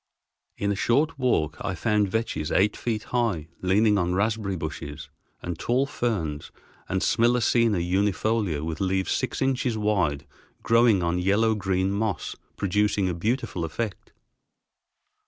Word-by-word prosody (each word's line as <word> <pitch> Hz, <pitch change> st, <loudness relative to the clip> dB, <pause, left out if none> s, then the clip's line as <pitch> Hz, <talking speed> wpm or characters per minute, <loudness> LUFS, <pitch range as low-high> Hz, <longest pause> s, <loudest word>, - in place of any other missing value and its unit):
In 100 Hz, 0 st, 0 dB
a -, -, 0 dB
short 140 Hz, +9 st, +1 dB
walk 80 Hz, -, +1 dB
I 95 Hz, -, -2 dB
found 105 Hz, +3 st, +1 dB
vetches 110 Hz, -8 st, -2 dB
eight 100 Hz, +2 st, +3 dB
feet 110 Hz, -3 st, -2 dB
high 105 Hz, -11 st, 0 dB
leaning 105 Hz, +3 st, +3 dB
on 90 Hz, 0 st, 0 dB
raspberry 105 Hz, -1 st, 0 dB
bushes, 75 Hz, -2 st, -6 dB, 0.3 s
and 85 Hz, -2 st, -4 dB
tall 125 Hz, +3 st, +1 dB
ferns 95 Hz, -, -2 dB, 0.4 s
and 95 Hz, 0 st, 0 dB
Smilacina 115 Hz, -2 st, +3 dB
unifolia 95 Hz, -1 st, 0 dB
with 80 Hz, +1 st, -4 dB
leaves 95 Hz, 0 st, 0 dB
six 130 Hz, +1 st, -1 dB
inches 130 Hz, -3 st, 0 dB
wide 90 Hz, -10 st, 0 dB, 0.4 s
growing 115 Hz, -5 st, +4 dB
on 85 Hz, +1 st, 0 dB
yellow 105 Hz, +5 st, +2 dB
green 95 Hz, -2 st, 0 dB
moss, 100 Hz, -3 st, -2 dB, 0.2 s
producing 100 Hz, 0 st, +1 dB
a -, -, -1 dB
beautiful 105 Hz, 0 st, -2 dB
effect. 100 Hz, +6 st, -4 dB
100 Hz, 135 wpm, -25 LUFS, 90-115 Hz, 0.4 s, growing